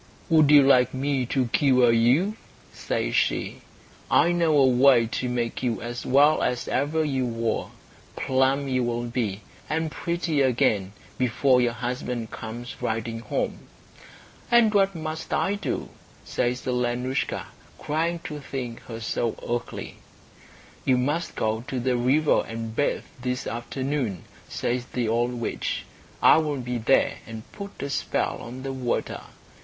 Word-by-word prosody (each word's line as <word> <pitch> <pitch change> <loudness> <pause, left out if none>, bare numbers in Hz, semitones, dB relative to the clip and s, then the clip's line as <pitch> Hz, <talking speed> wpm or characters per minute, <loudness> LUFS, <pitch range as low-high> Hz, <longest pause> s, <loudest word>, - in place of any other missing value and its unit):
"Would 155 -3 +5
you 145 -1 +8
like 130 -2 +4
me 135 -1 0
to 130 +1 +1
cure 125 -2 +4
you?" 130 - +3 0.4
says - - -2
she. - - 0 0.5
"I 175 - +4
know 165 -3 +3
a 135 - +6
way 125 -1 +5
to 125 +2 -3
make 120 -1 -2
you 120 -3 -1
as 120 +1 -6
well 145 +4 +5
as 125 -1 -1
ever 155 +4 0
you 135 -3 0
were. 115 -1 -1 0.5
Plump 135 +2 +1
you 130 -1 +1
will 120 0 -1
be, 115 -4 -2 0.3
and 160 +1 -1
pretty 170 -4 -1
again, 110 -7 +2 0.3
before 125 +1 +3
your 120 -1 +1
husband 120 -1 -4
comes 120 +2 -7
riding 115 +1 -2
home." 115 - -3 0.8
"And 235 -3 +5
what 195 -2 +3
must 155 0 -4
I 195 - +1
do?" 205 - -3 0.4
says 125 +1 -1
Alenoushka, 125 +1 -1 0.3
crying 165 +3 -1
to 150 -1 -6
think 130 -4 -6
herself 115 0 -3
so - - -10
ugly. 120 - -6 0.9
"You 130 - +3
must 145 +7 -1
go 110 +1 -1
to 130 -3 -2
the 125 +1 +1
river 135 +6 +3
and 115 0 -5
bathe 145 - 0 0.2
this 125 +1 -2
afternoon," 125 - -3 0.3
says 125 0 -2
the 125 -2 -2
old 120 +2 +1
witch. 120 -1 -3 0.4
"I - - +8
will 150 -3 0
be 125 0 -3
there 115 +4 +3
and 110 -1 -7
put 200 -5 -8
a 140 - -3
spell - - -1
on 125 +3 -8
the 135 0 -3
water. 125 -2 -2
125 Hz, 150 wpm, -25 LUFS, 120-145 Hz, 0.9 s, you